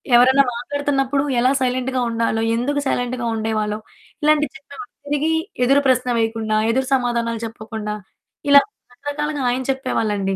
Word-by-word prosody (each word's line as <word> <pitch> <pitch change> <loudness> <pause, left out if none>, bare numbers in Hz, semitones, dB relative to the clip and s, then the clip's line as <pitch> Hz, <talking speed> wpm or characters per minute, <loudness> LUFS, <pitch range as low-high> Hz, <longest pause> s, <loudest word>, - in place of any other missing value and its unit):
ఎవరైనా 260 +3 +6
మాట్లాడుతున్నప్పుడు 275 +1 -1 0.2
ఎలా 255 +2 +4
సైలెంట్‌గా 255 0 0
ఉండాలో 230 -1 0
ఎందుకు 285 +5 0
సైలెంట్‌గా 245 -1 -1
ఉండేవాళ్ళో, 215 -1 -1 0.4
ఇలాంటివి 300 0 +3
చెప్పేవాళ్ళు. 280 -2 -11 0.2
తిరిగి 295 +2 0 0.3
ఎదురు 275 +3 +4
ప్రశ్న 255 -1 +2
వేయకుండా, 225 -1 0
ఎదురు 260 +3 +1
సమాధానాలు 235 -3 0
చెప్పకుండా 215 -1 -6 0.6
ఇలా 280 0 +9 0.3
రకరకాలుగా 290 +2 -4
ఆయన 255 +2 0
చెప్పేవాళ్ళండి. 210 -7 -1
250 Hz, 120 wpm, -20 LUFS, 225-275 Hz, 0.6 s, ఇలా